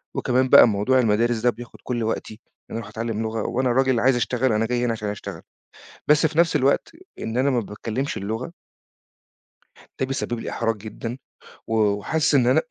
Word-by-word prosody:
وكمان 130 +1 +1
بقى - - +9
موضوع 110 +5 +2
المدارس 115 +1 +2
ده 125 +2 +3
بياخُد 120 +1 -8
كلّ 120 -2 -2
وقتي، 110 0 -3 0.3
إن - - -
أنا - - -5
أروح 115 - -8
أتعلّم 115 -1 -3
لغة 110 0 -2
وأنا 130 +1 0
راجل 130 -1 +2
عايز 130 +2 +3
أشتغل، 125 +1 0
أنا 110 +1 +1
جاي 120 +1 0
هنا 120 - +1
عشان 110 -2 -3
أشتغل، 105 - -7 0.7
بس 150 +2 +5
في 155 0 -4
نفْس 170 -2 +4
الوقت 140 0 +2 0.3
إن 110 +1 -4
أنا 135 +2 +2
ما 125 -3 +1
باتكلّمش 115 +6 -4
اللغة 110 +9 -4 1.5
ده 130 - 0
بيسبّب 130 -3 -3
لي - - -5
إحراج 115 -1 -1
جدًا، 115 +3 -7 0.5
و 115 - -3
وحاسس 110 +9 +1
إن 125 -3 +4
أنا، 130 +5 +4
120 Hz, 190 wpm, -23 LUFS, 110-130 Hz, 1.5 s, بقى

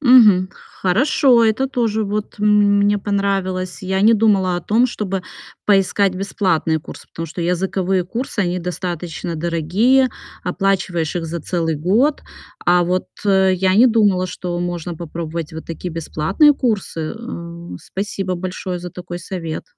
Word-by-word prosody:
Мгм. 215 -9 +6 0.3
Хорошо. 245 - +4
Это 225 +4 +2
тоже 230 -5 0
вот 210 +1 -3
м 205 -1 +4
мне 205 0 +3
понравилось. 195 -2 -1
Я 190 +1 0
не 220 +2 +6
думала 200 -5 +3
о - - -3
том, 225 +7 +2
чтобы 195 -6 -3 0.4
поискать 195 -1 +3
бесплатные 185 -4 0
курсы, - - -11
потому 165 - -6
что 165 +3 -7
языковые 185 +1 0
курсы, 235 +4 -4
они 180 -1 0
достаточно 175 -1 -4
дорогие. 175 +11 +2 0.3
Оплачиваешь 180 -3 -1
их 170 - -2
за 170 +1 -4
целый 165 -1 -1
год. 215 - +2 0.5
А 175 0 +4
вот 180 +1 -1 0.2
я 190 -1 +3
не 235 +5 +7
думала, 205 -6 +3
что 180 -1 -4
можно 175 -1 -3
попробовать 165 -1 -5
вот 160 - -7
такие 170 +2 -6
бесплатные 165 - +2
курсы. 220 - -2 0.2
Э, 170 -7 -8
спасибо 195 +2 -4
большое 185 0 -4
за 180 0 -7
такой 175 0 -7
совет. 170 -3 -5
185 Hz, 145 wpm, -19 LUFS, 175-205 Hz, 0.5 s, не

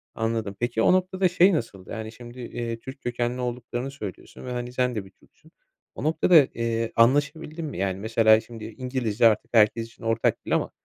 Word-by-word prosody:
Anladım. 115 -3 -2
Peki, 120 -1 0
o - - +5
noktada 185 0 +2
şey 180 +2 +5
nasıldı? 100 - -4
Yani, 110 -1 -5
şimdi, 120 +2 -12
eee, 115 -1 -5
Türk 130 +3 -10
kökenli 120 +1 -2
olduklarını 125 +1 -4
söylüyorsun 105 -6 -9
ve, 125 - -5
hani, 125 0 -4
sen 125 -1 0
de 105 -3 -3
bir 95 - -16
Türksün. - - -25 0.4
O - - -6
noktada, 160 +3 +3 0.2
eee, 115 -1 -1
anlaşabildin 145 +6 +2
mi? 145 - -6
Yani, 95 0 -1
mesela, 110 +1 +4
şimdi, 115 -1 -10
İngilizce 120 -2 +1
artık 110 +1 0
herkes 115 0 +4
için 115 - -18
ortak 115 0 0
dil - - +1
ama, - - -1
120 Hz, 190 wpm, -25 LUFS, 115-130 Hz, 0.4 s, o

